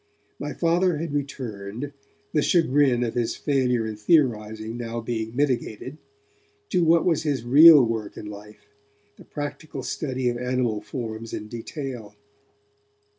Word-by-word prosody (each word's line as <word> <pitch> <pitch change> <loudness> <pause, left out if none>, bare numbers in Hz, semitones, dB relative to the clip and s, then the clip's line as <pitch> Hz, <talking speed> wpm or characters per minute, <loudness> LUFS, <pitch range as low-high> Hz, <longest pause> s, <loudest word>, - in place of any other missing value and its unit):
My - - -4
Father 175 0 +2
had 160 -1 -4
returned, 125 -3 -5 0.4
the 150 - +3
chagrin 145 -7 +3
of 115 - -2
his 120 -2 -1
failure 125 -5 +1
in 110 -1 -4
theorizing 110 -4 +1
now 120 -1 -4
being 115 -1 -4
mitigated, 130 0 -2 0.7
to 180 - +2
what 165 0 +4
was 170 -4 +2
his 145 -6 -1
real 145 +2 +8
work 110 -2 -4
in - - -7
life, 105 +1 -11 0.5
the - - -14
practical 145 -1 -6
study 130 -4 -2
of 120 0 -1
animal 125 -4 -1
forms 115 -1 -6
in 105 - -5
detail. 120 -2 -7
125 Hz, 135 wpm, -24 LUFS, 110-145 Hz, 0.7 s, real